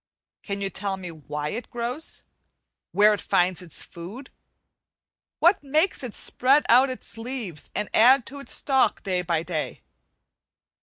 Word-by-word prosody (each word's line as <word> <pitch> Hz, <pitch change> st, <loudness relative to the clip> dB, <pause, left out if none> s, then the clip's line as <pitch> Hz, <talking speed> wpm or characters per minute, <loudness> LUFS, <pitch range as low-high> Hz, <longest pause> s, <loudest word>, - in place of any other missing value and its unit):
Can 200 Hz, -1 st, -4 dB
you 195 Hz, -1 st, -2 dB
tell 195 Hz, -1 st, -3 dB
me 180 Hz, -2 st, -7 dB
why 150 Hz, -1 st, -5 dB
it 230 Hz, +8 st, -5 dB
grows? 245 Hz, +6 st, -4 dB, 0.7 s
where 210 Hz, +1 st, +5 dB
it 205 Hz, -, -3 dB
finds 180 Hz, 0 st, +1 dB
its 170 Hz, -4 st, -7 dB
food? 200 Hz, +11 st, -10 dB, 1.1 s
what 345 Hz, 0 st, +4 dB
makes 310 Hz, +7 st, +1 dB
it 245 Hz, -4 st, -5 dB
spread 275 Hz, +4 st, +3 dB
out 255 Hz, +3 st, +6 dB
its 255 Hz, -3 st, -8 dB
leaves 225 Hz, -, -5 dB
and 210 Hz, 0 st, -1 dB
add 250 Hz, +3 st, +6 dB
to 280 Hz, +1 st, -5 dB
its 275 Hz, -, -5 dB
stalk 265 Hz, -2 st, +2 dB
day 185 Hz, -2 st, 0 dB
by 170 Hz, -2 st, -1 dB
day? 170 Hz, -3 st, -4 dB
215 Hz, 150 wpm, -25 LUFS, 180-260 Hz, 1.1 s, out